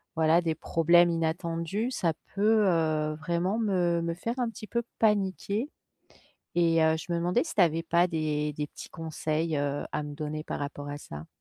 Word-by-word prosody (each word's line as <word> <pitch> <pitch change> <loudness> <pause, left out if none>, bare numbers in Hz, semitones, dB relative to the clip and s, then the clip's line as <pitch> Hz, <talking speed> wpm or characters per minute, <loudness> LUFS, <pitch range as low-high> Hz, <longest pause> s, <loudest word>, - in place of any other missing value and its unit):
voilà, 160 +1 +4
des 165 -2 0
problèmes 170 +2 +4
inattendus, 170 +6 -1
ça 170 -10 0 0.2
peut, 215 +1 +4
heu, 155 -3 +1
vraiment 170 +6 -1
me 180 -6 +1
me 170 0 -1
faire 230 +7 -3
un 240 - +1
petit 225 -1 -9
peu 235 +2 -1 0.2
paniquer, 210 +3 +1 0.9
et 165 -2 +4
heu, 160 0 +4
je 165 +2 -7
me 170 - +1
demandais 175 +8 +1
si 320 - -6
tu 205 - +4
avais 165 -1 +3
pas 170 +1 +3
des 150 -2 -1
des 150 0 -3
petits - - -11
conseils, 160 0 -2
heu, 145 0 -1
à - - -1
me 145 - -6
donner 155 0 -4
par - - -4
rapport 145 0 -5
à 145 - -4
ça? 75 - -9
165 Hz, 190 wpm, -28 LUFS, 155-185 Hz, 0.9 s, voilà